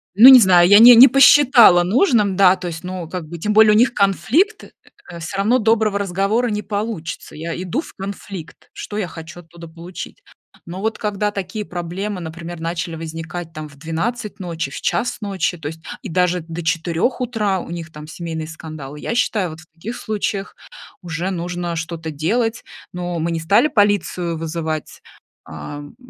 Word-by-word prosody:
ну 230 +6 +9
не 260 -2 +10
знаю, 180 -4 +5
я 205 +1 +8
не 240 +2 +10
не 255 +4 +10
посчитала 255 -7 +6
нужным, 210 - +2
да, 190 -1 +5
то 180 -1 -7
есть 165 -1 -6
ну, 180 -2 -6
как 175 -3 -6
бы 170 +2 -8
тем 210 +6 -1
более 215 0 +6
у - - +4
них 240 +2 +3
конфликт, 280 - +1
э, 405 - -15
всё 160 +3 -6
равно 220 +6 +3
доброго 220 -3 +1
разговора 200 +5 0
не 210 -1 -2
получится. 200 -7 -5
Я 165 +2 -5
иду 185 - -2
в - - -13
конфликт- 195 -4 -9
что 210 - -7
я 200 - -1
хочу 165 0 -10
оттуда 170 0 -13
получить? 170 - -10 0.4
Но 175 +2 -7
вот 220 +2 -2
когда 210 0 -1
такие 205 +2 -5
проблемы, 185 +3 -5
например, 170 +1 -8
начали 170 0 -4
возникать 165 +1 -7
там 155 -1 -7
в 145 - -18
12:00 195 - -4
ночи, 165 -5 -4
в - - -6
1:00 245 +1 -1
ночи, 195 -4 -2
то 155 - -5
есть, 160 +1 -9 0.2
и - - -7
даже 180 +1 +1
до 165 +1 -7
4:00 170 +8 -1
утра 215 -6 -1
у - - -9
них 170 -1 -7
там 150 0 -10
семейные 160 -1 -6
скандалы, 155 -3 -9
я 230 - -4
считаю, 215 -7 0
вот 160 +1 -10
в 160 - -18
таких 190 +9 -7
случаях 205 -2 -4 0.5
уже 175 +1 -4
нужно 175 -1 -4
что-то 160 0 -5
делать. 225 +10 -1 0.3
Ну, 175 -1 -4
мы 165 +2 -1
не 165 - -2
стали 200 - +3
полицию 205 - 0
вызывать, 160 -1 -5 0.4
ам, 145 0 -9
180 Hz, 180 wpm, -19 LUFS, 165-210 Hz, 0.5 s, не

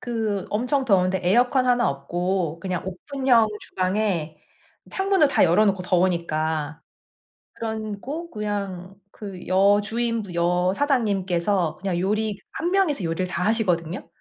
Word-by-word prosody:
그 220 -5 -2
엄청 250 +6 0
더운데 190 -4 +2
에어컨 245 +7 +3
하나 245 -1 +3
없고 175 +4 -2
그냥 180 -1 -3
오픈형 240 +4 +2
주방에 185 -5 -1 0.5
창문을 385 -5 +2
다 - - +4
열어놓고 190 +2 +3
더우니까. 160 -4 0 0.7
그러고 220 +9 -5
그냥 200 - -4 0.2
그 195 -4 -9
여주인 205 +5 +2
분 195 -4 -9
여사장님께서 185 - +1
그냥 190 -3 -1
요리 210 +2 0
1 340 - -2
명이서 360 - +1
요리를 165 +2 -1
다 180 - -3
하시거든요. 180 -6 0
195 Hz, 275 characters per minute, -24 LUFS, 180-230 Hz, 0.7 s, 다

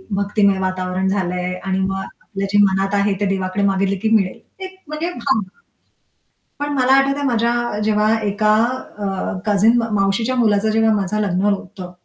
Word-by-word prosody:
भक्तिमय 200 -1 +1
वातावरण 185 0 -2
झालंय 180 -2 -2
आणि 190 0 -1
मग 195 0 -1
आपल्या 195 -1 -7
जे - - +4
मनात 195 0 +1
आहे 200 0 +2
ते 205 - 0
देवाकडे 190 0 -1
मागितलं 195 0 +1
की 220 - +1
मिळेल. 195 +2 0 0.3
एक 375 - -10
म्हणजे 305 +3 -3
भावना. 265 - -1 1.1
पण 290 0 -3
मला 260 -1 +2
आठवतंय 275 +1 +1
माझ्या 240 -2 0
जेव्हा 215 0 +2
एका 210 +1 +2 0.4
अ, 205 - -3 0.4
कझिन 215 +3 +4
म 230 - 0
मावशीच्या 210 +6 0
मुलाचं 215 -3 +2
जेव्हा 225 0 +3
माझं 210 +1 -1
लग्न 190 -2 0
होतं 190 -2 -9
205 Hz, 160 wpm, -19 LUFS, 195-225 Hz, 1.1 s, जे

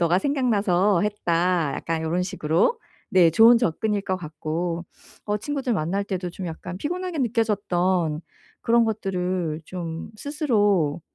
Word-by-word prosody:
'너가 175 +1 +3
생각나서 205 -8 +2
했다.' 175 -6 +1
약간 165 -1 -3
요런 165 +3 0
식으로? 180 - +1 0.3
네 175 -3 +5
좋은 225 +7 +7
접근일 210 0 0
것 190 -1 -1
같고 165 +1 -4 0.4
어 210 - 0
친구들 270 +2 -2
만날 190 +1 0
때도 185 -3 -4
좀 185 +1 -7
약간 170 +2 -6
피곤하게 355 - -3
느껴졌던 190 - 0 0.4
그런 235 0 +4
것들을 180 -6 -2
좀 165 -2 -6
스스로 205 - +1
185 Hz, 280 characters per minute, -24 LUFS, 170-220 Hz, 0.4 s, 좋은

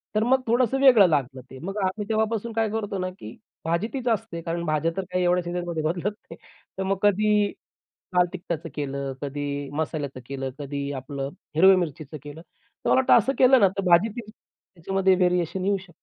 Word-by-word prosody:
तर 215 - +3
मग 260 +3 +3
थोडंसं 245 +3 +2
वेगळं 245 -8 +7
लागलं 135 -3 -1
ते. 130 - -10
मग 195 +3 -5
आम्ही 190 +2 -2
तेव्हापासून 220 +1 -1
काय 225 -1 +1
करतो 205 -2 -3
ना, 185 0 -2
की 110 +2 -10 0.3
भाजी 170 +6 0
तीच 255 -2 -4
असते 225 -7 -1
कारण 170 +1 -3
भाज्या 155 +2 0
तर 195 - -1
काय 180 0 0
एवढ्या 180 0 +2
सीझनमध्ये 175 -2 -3
बदलत 175 +5 -1 0.2
नाही - - -7 0.4
तर 190 - -1
मग 195 +1 0
कधी 210 0 +3 0.7
लाल 180 0 +5
तिखटाचं 170 -3 -5
केलं, 140 -2 -3
कधी 145 0 -4
मसाल्याचं 145 -3 -3
केलं, 135 0 -4
कधी 140 0 -4
आपलं 135 +1 -5 0.3
हिरव्या 190 +4 +7
मिरचीचं 155 -3 -4
केलं. 145 +2 -9
तर 165 0 -11
मला - - +5
वाटतं 260 - +5
असं 270 - 0
केलं 255 0 +6
ना, 195 - +6
तर - - +1
भाजीतही 210 +6 +2
त्याच्यामध्ये 190 -2 -2
व्हेरिएशन 180 0 +1
येऊ 200 +1 +2
शकतं. 190 0 -11
180 Hz, 185 wpm, -25 LUFS, 150-210 Hz, 0.7 s, वेगळं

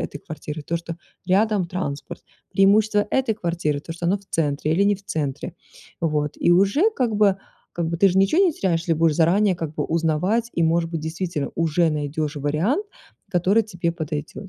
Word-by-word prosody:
этой - - -5
квартиры 155 -1 -7
то, 170 - -2
что 170 0 -7 0.3
рядом 200 0 +2
транспорт, 165 -5 -5 0.3
преимущества 205 +1 +3
этой 260 -5 +1
квартиры 170 -6 -2
то, 165 - -7
что 170 +1 -4
она 185 +4 +2
в 200 - -22
центре 150 -1 0
или 195 +4 +3
не 205 - +3
в 200 - -20
центре. 145 -7 -3 0.5
Вот, 150 -2 0
и - - +2
уже 200 - +4
как 240 -4 0
бы, 200 -2 +4 0.4
как 170 -1 -2
бы 170 - -2
ты 195 - +6
же 185 - +1
ничего 195 - +4
не 355 - +3
теряешь, 180 - 0
если 170 0 -1
будешь 160 -1 +2
заранее 185 +4 +3
как 160 -3 -5
бы 150 - -2
узнавать, 170 +8 0
и, 170 - 0
может 165 +1 +1
быть, 165 -2 -3
действительно 160 -1 -3
уже 165 0 +2
найдешь 150 0 -3
вариант, 165 - 0 0.4
который 195 +4 +3
тебе 175 -5 -2
подойдет. 160 +3 -5
170 Hz, 190 wpm, -23 LUFS, 155-200 Hz, 0.5 s, ты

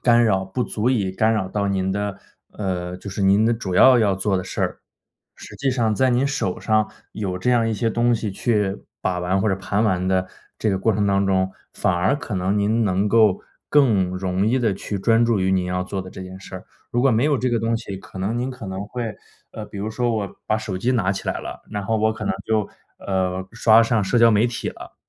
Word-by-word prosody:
干 120 -1 +5
扰， 95 -4 +2
不 95 +7 -3
足 110 0 -1
以 105 -7 +1
干 110 +4 +2
扰 95 -4 -1
到 100 +1 -1
您 95 -1 0
的 100 0 -2 0.4
呃， 90 -3 -3
就 100 +2 -8
是 95 - -5
您 100 +3 +4
的 115 - +3
主 105 -5 -3
要 130 +6 +7
要 105 -4 +3
做 95 +1 0
的 90 - -3
事 - - -5
儿。 - - -1 0.6
实 - - -12
际 140 - -1
上 120 -4 +1
在 130 +5 +2
您 125 +2 +2
手 140 -9 -2
上， 110 -1 +2 0.2
有 95 -4 -3
这 95 +7 0
样 115 -2 +3
一 110 - -1
些 115 +2 0
东 120 +2 +2
西 110 -2 -2
去 105 -1 -1 0.2
把 90 -1 -1
玩， 90 +2 0
或 105 - +1
者 95 - +1
盘 100 +2 -1
玩 95 -4 +1
的 95 0 +1 0.3
这 110 - +1
个 95 - 0
过 110 +4 +2
程 105 0 +1
当 100 0 +2
中， 95 -1 +1 0.2
反 95 - 0
而 90 +7 +2
可 115 -8 -5
能 95 +3 0
您 110 +3 +2
能 100 +1 +1
够， 105 -3 +4 0.3
更 110 -11 +3
容 95 +1 -1
易 125 +4 +2
地 115 -4 +2
去 100 +2 -4
专 115 +4 +3
注 115 -4 +1
于 95 0 +1
您 95 -1 +1
要 90 0 -1
做 95 +1 -4
的 95 - -8
这 95 - -9
件 95 0 -9
事 95 - -11
儿。 95 - -8 0.3
如 120 - +1
果 135 - +4
没 115 +2 +2
有 150 -1 +3
这 125 0 -1
个 120 - +1
东 115 +1 0
西， 105 -4 -6
可 95 - -13
能 105 +5 -1
您 125 +2 -2
可 125 -3 -8
能 95 +2 -5
会 115 -1 -5 0.3
呃， 110 - -7
比 - - -11
如 105 +2 -3
说 120 +1 0
我 100 -2 -4
把 110 - +2
手 105 -4 -4
机 120 +7 +1
拿 100 -7 +1
起 95 - -4
来 - - -2
了， - - -8
然 105 - -3
后 110 +3 0
我 110 0 +2
可 110 - -7
能 - - +1
就， 110 -2 +1 0.3
呃， 95 -1 -2
刷 115 -1 +5
上 115 -2 +1
社 120 +6 +1
交 115 0 +7
媒 110 +2 +3
体 120 -1 -4
了。 - - -10
105 Hz, 270 characters per minute, -22 LUFS, 95-115 Hz, 0.6 s, 要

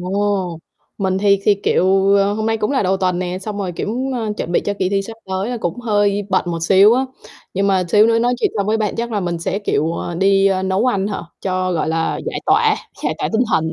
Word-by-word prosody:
Ồ, 190 -2 -1 0.4
mình 190 -1 0
thì 200 0 +3
thì, 205 - +4
kiểu, 195 +1 +3
ờ, 200 0 +3
hôm 220 +1 -2
nay 225 0 +1
cũng 210 -1 -1
là 275 - +1
đầu 190 +1 +1
tuần 185 -2 0
nè, 180 0 -3
xong 205 +1 -6
rồi, 190 -3 -3
kiểu, 205 +5 -3 0.2
ơ, 225 -3 -2
chuẩn 175 - -4
bị - - +3
cho 205 - -1
kỳ 185 - +1
thi 195 0 0
sắp 225 +3 -8
tới 190 +2 -2
là 245 - -2
cũng 175 +6 -3
hơi 205 -3 +1
bận 185 -2 +1
một 170 - -2
xíu 195 +6 +6
á. 260 - +1 0.5
Nhưng 195 +1 +1
mà 190 -2 +2
xíu 210 +5 +5
nữa 230 0 +3
nói 245 +2 +1
chuyện - - +2
xong 200 -1 0
với 215 +1 +2
bạn 215 -2 -1
chắc 235 0 -3
là 210 - 0
mình 175 -2 -2
sẽ, 180 +4 -2
kiểu, 165 -5 0
ờ, 175 - -4
đi, 195 +2 +3
ơ, 190 -1 +1
nấu 190 +5 +1
ăn 200 -6 +1
hả, 205 -1 -4 0.2
cho, 185 -1 -1
gọi 160 -2 -1
là, 165 0 -1
giải - - -3
tỏa, - - +4 0.3
giải - - 0
tỏa - - -1
tinh 225 +2 +3
thần. 160 0 +2
195 Hz, 260 wpm, -18 LUFS, 185-210 Hz, 0.5 s, xíu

